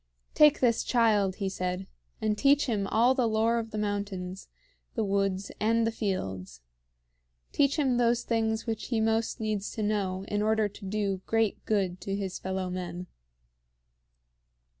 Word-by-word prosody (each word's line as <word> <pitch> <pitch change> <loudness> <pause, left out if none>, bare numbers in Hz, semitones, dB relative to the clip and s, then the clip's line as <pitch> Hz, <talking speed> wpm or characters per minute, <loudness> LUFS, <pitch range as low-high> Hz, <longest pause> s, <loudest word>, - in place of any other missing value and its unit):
"Take 300 -1 +5
this 235 -3 +3
child," 210 -6 +2
he 195 -1 -2
said, 185 0 -3 0.3
"and 215 -1 0
teach 280 +6 +4
him 210 -6 -1
all 235 +5 +4
the 255 -3 +1
lore 225 +1 +2
of 225 -1 -5
the 215 - -6
mountains, 200 -3 -3 0.5
the 225 - 0
woods, 195 -1 0
and 225 +1 +2
the 225 - +1
fields. 95 - -4 0.9
Teach 280 +2 +2
him 265 -5 +2
those 240 0 +2
things 225 -1 0
which 225 -2 -3
he 235 -3 0
most 225 +2 0
needs 215 -2 -2
to 220 - -3
know 195 -3 -1
in 205 0 -1
order 220 0 +2
to 205 0 -12
do 200 -2 -1
great 225 -2 +1
good 190 -4 0
to 195 - -3
his 195 -2 -4
fellow 190 0 -3
men." 180 -1 -5
210 Hz, 160 wpm, -28 LUFS, 195-225 Hz, 0.9 s, Take